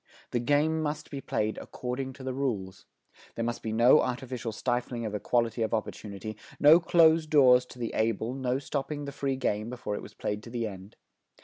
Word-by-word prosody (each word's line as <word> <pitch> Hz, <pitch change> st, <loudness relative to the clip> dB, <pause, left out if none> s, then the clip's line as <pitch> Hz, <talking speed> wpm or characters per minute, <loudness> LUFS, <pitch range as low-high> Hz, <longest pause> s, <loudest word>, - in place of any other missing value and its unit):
The 120 Hz, -, +1 dB
game 145 Hz, +6 st, +2 dB
must 150 Hz, 0 st, -3 dB
be 140 Hz, -2 st, -5 dB
played 110 Hz, -3 st, -1 dB
according 130 Hz, +1 st, -5 dB
to 130 Hz, -, -11 dB
the 130 Hz, 0 st, -3 dB
rules. 105 Hz, -9 st, -3 dB, 0.5 s
There 115 Hz, -, -2 dB
must 120 Hz, 0 st, -3 dB
be 110 Hz, -, -3 dB
no 120 Hz, +6 st, +6 dB
artificial 125 Hz, -2 st, -3 dB
stifling 120 Hz, +1 st, -2 dB
of 105 Hz, -, -4 dB
equality 115 Hz, +2 st, 0 dB
of 110 Hz, 0 st, +1 dB
opportunity, 110 Hz, -1 st, -5 dB, 0.2 s
no 150 Hz, +3 st, +8 dB
closed 165 Hz, -2 st, +4 dB
doors 125 Hz, -4 st, +6 dB
to -, -, -13 dB
the 120 Hz, -2 st, -4 dB
able, 110 Hz, +2 st, 0 dB
no 130 Hz, -1 st, -1 dB
stopping 145 Hz, +1 st, -4 dB
the 140 Hz, -, -5 dB
free 140 Hz, -1 st, -2 dB
game 110 Hz, -4 st, -1 dB
before 120 Hz, -4 st, -4 dB
it -, -, -3 dB
was -, -, -12 dB
played 105 Hz, 0 st, -3 dB
to 115 Hz, -, -11 dB
the 115 Hz, -1 st, -2 dB
end. 95 Hz, -1 st, -8 dB
125 Hz, 195 wpm, -29 LUFS, 110-135 Hz, 0.5 s, no